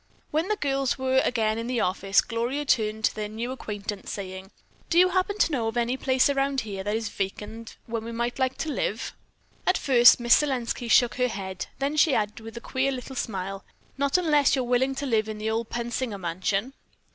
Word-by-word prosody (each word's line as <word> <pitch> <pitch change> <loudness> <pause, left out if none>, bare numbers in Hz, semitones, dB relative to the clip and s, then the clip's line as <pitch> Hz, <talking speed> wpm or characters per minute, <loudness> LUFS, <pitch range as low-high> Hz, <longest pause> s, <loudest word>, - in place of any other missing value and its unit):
When 315 +4 0
the 425 - +1
girls 275 -6 0
were 260 0 +2
again 220 -2 +1
in 230 - -4
the 250 -1 -1
office, 195 +1 +2
Gloria 245 +5 -2
turned 220 -3 +1
to - - +2
their 215 -1 -3
new 230 +4 -4
acquaintance, 205 -5 -6
saying, 190 -1 -6 0.4
"Do 340 - +1
you 365 +1 +7
happen 375 +3 0
to 335 - +3
know 240 -6 0
of 225 +2 -3
any 240 +1 +1
place 260 -1 +2
around 275 -1 +1
here 195 -3 -5
that 205 +2 -1
is 225 -1 -2
vacant 210 +3 -5
where 230 -1 -3
we 230 +1 -6
might 235 +2 -2
like 260 0 0
to 310 - -2
live?" 225 -4 -2 0.5
At 370 - +4
first 245 -3 +6
Miss 235 0 +6
Selenski 250 -4 -2
shook 240 -1 +4
her 250 -1 +2
head. 190 -4 -5
Then 280 +3 -1
she 300 -2 +5
added, 210 0 -1
with 225 +1 -10
a - - -6
queer 265 +2 0
little 260 0 -6
smile, 195 -4 -4 0.3
"Not 280 +3 +2
unless 300 -6 +3
you're 260 - 0
willing 250 +2 +1
to 280 - -3
live 220 -4 +1
in 215 - -5
the 215 +1 -2
old 225 0 -2
Pensinger 235 -2 -3
mansion." 190 +7 -2
235 Hz, 210 wpm, -26 LUFS, 215-270 Hz, 0.5 s, you